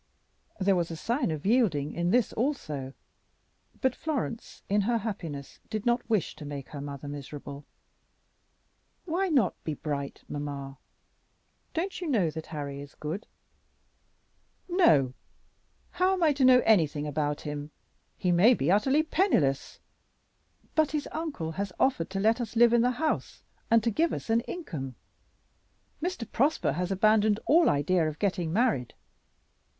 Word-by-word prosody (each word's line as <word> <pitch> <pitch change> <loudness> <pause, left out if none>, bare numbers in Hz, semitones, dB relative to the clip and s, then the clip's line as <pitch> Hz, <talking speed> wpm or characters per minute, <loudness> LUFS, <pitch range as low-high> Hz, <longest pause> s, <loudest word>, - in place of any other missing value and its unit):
There 195 0 +3
was 175 -2 0
a 165 - -5
sign 240 - -1
of 155 0 -4
yielding 190 - +2
in 170 +1 0
this 245 +3 +2
also; 155 - -2 0.9
but 260 -1 +2
Florence 275 -7 -4
in 205 +1 +2
her 230 +4 +1
happiness 170 -10 -6
did 215 -2 -3
not 240 0 +1
wish 215 -5 0
to - - -9
make 145 -2 -6
her 145 - -7
mother 140 0 -7
miserable, 145 0 -8 1.4
"Why 370 +3 0
not 260 - +1
be 155 - -3
bright, 140 -1 -4
mamma? 140 -2 -5 1.0
Don't 370 +3 -2
you 350 - -3
know 205 - +2
that 160 0 -7
Harry 140 -3 -5
is 145 0 -12
good?" 160 +8 -5 1.4
"No. 155 - +4 0.8
How 365 +2 +2
am 370 -2 0
I 310 -2 +5
to 275 -2 +2
know 255 -1 +7
anything 155 -8 +3
about 145 0 -1
him? 150 -1 -5 0.5
He 180 - +1
may 205 +9 +6
be 150 -1 +1
utterly 265 +10 +3
penniless." 310 - +1 0.9
"But 310 -1 +2
his 300 -1 -1
uncle 290 - -4
has 195 +3 -3
offered 255 -11 +2
to 195 0 -3
let 225 +4 +3
us 235 -1 -5
live 235 0 +6
in 235 - +5
the 245 - +3
house 315 0 -2 0.3
and 230 -1 +5
to 230 - +1
give 325 +10 +1
us - - -4
an 225 - +4
income. 145 - -5 1.1
Mr. 345 - -3
Prosper 280 +6 +2
has 180 +3 -2
abandoned 215 +2 +3
all 330 +2 +5
idea 160 +3 +2
of 155 -1 -4
getting 180 -5 -1
married." 205 - +1
195 Hz, 150 wpm, -28 LUFS, -, 1.4 s, know